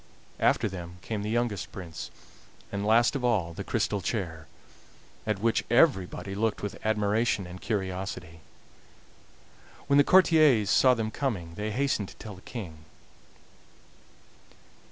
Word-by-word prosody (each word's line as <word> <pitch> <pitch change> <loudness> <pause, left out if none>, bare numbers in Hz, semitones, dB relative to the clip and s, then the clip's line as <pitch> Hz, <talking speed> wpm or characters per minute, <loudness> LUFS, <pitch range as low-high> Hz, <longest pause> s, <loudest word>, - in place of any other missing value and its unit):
After 115 - +3
them 90 -2 -7
came 110 -2 -3
the 105 - -3
youngest 115 -4 -1
prince, 85 -4 -7 0.6
and 100 0 -2
last 120 +5 +4
of 135 - -2
all 100 -9 +1
the - - -6
crystal 100 - -1
chair, 85 -7 -3 0.8
at 105 -2 +1
which 115 +3 +1
everybody 110 - +2
looked 110 +1 -1
with 105 - -5
admiration 105 -1 +1
and 90 +1 -10
curiosity. 95 -5 -4 1.5
When 140 - +3
the 145 - +7
courtiers 155 - +5
saw 130 +3 +5
them 110 -2 -2
coming 100 -13 -3
they 105 +4 -3
hastened 120 -4 0
to - - -13
tell 110 - -9
the 95 - -13
King. 90 -11 -8
105 Hz, 135 wpm, -28 LUFS, 95-120 Hz, 1.5 s, the